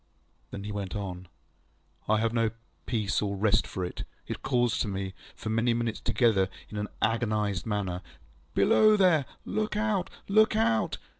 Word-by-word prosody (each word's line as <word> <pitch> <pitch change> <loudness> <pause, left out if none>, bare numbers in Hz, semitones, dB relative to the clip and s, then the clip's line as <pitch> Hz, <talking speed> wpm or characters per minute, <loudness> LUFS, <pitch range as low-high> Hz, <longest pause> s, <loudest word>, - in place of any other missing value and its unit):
ŌĆØ - - -40
Then 100 - -7
he 105 - -5
went 100 -2 -4
on. 95 -3 -5 0.8
ŌĆ£I 110 - +4
have 115 +1 +1
no 115 -2 +2 0.4
peace 110 -5 0
or 100 -1 -1
rest 110 +2 +2
for 90 - -3
it. 90 - -5 0.2
It - - -5
calls 120 -3 +1
to - - 0
me, 95 -1 -3 0.2
for 110 - -5
many 115 +2 +2
minutes 115 -2 -1
together, 105 -6 +2 0.2
in 105 - -5
an 105 - -2 0.2
agonised 110 -4 0
manner, 95 -4 -2 0.5
ŌĆśBelow 215 0 +5
there! 175 -8 +4 0.2
Look 215 0 -1
out! 210 -4 0 0.2
Look 215 +2 +4
out! 110 0 +2
110 Hz, 165 wpm, -28 LUFS, 100-120 Hz, 0.8 s, ŌĆśBelow